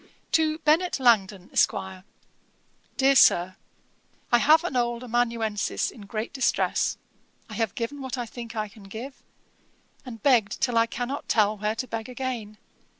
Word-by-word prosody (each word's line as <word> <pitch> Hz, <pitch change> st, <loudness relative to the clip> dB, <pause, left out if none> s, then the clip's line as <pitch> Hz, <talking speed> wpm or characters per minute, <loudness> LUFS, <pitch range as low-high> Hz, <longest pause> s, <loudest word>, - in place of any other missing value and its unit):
'To 315 Hz, -1 st, +2 dB
BENNET 325 Hz, +2 st, +2 dB
LANGTON, 205 Hz, -7 st, +2 dB
ESQ. -, -, +3 dB, 1.2 s
'DEAR 275 Hz, 0 st, +4 dB
SIR, 185 Hz, -6 st, +5 dB, 0.8 s
'I 240 Hz, -, +6 dB
have 310 Hz, +5 st, +5 dB
an 345 Hz, -7 st, -3 dB
old 240 Hz, 0 st, 0 dB
amanuensis 230 Hz, -3 st, -1 dB
in 205 Hz, -4 st, -13 dB
great 215 Hz, +4 st, -4 dB
distress. 265 Hz, -2 st, 0 dB, 0.5 s
I -, -, -11 dB
have 225 Hz, -5 st, -2 dB
given 260 Hz, +5 st, -4 dB
what 260 Hz, 0 st, -4 dB
I 245 Hz, -, -3 dB
think 235 Hz, 0 st, -9 dB
I 215 Hz, -1 st, -2 dB
can 205 Hz, 0 st, -16 dB
give, 235 Hz, +7 st, -9 dB, 0.8 s
and 230 Hz, -5 st, -10 dB
begged 240 Hz, -7 st, +3 dB
till 245 Hz, -2 st, 0 dB
I 230 Hz, -, +3 dB
cannot 245 Hz, +4 st, -5 dB
tell 215 Hz, -1 st, +3 dB
where 210 Hz, +1 st, -2 dB
to 255 Hz, -, -4 dB
beg 225 Hz, +1 st, -5 dB
again. 245 Hz, -5 st, -5 dB
235 Hz, 150 wpm, -26 LUFS, 215-260 Hz, 1.2 s, I